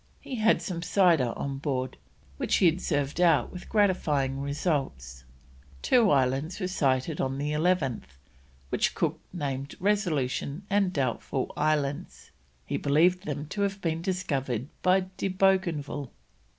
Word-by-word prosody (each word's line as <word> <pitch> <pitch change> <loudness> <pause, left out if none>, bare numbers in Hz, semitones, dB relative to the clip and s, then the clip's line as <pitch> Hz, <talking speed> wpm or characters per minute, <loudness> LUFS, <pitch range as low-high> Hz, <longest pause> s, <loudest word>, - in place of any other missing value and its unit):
He 260 - -6
had 220 +1 +3
some 175 -4 -4
cider 170 - +3
on 135 -1 -4
board, 130 -3 -2 0.4
which - - +1
he 190 - +3
had 170 +2 +3
served 145 +4 -1
out 175 -2 +4
with 180 - -9
gratifying 150 -10 +1
results. 135 - -2 0.6
Two 235 -5 +4
islands 135 +6 +1
were 185 - -1
sighted 140 -4 0
on 135 0 -1
the 145 +2 -2
11th, 150 - 0 0.5
which - - 0
Cook - - -1
named 140 -5 -4
Resolution 170 -5 0
and 200 -2 +3
Doubtful 130 -3 -2
Islands; 150 -2 -1 0.3
he - - -2
believed 175 +6 +2
them 145 0 -3
to 205 - -3
have 200 0 0
been 165 -3 -2
discovered 140 - -2
by 185 +1 +4 0.2
De - - -1
Bougainville. 185 -8 +1
150 Hz, 135 wpm, -28 LUFS, 135-185 Hz, 0.6 s, out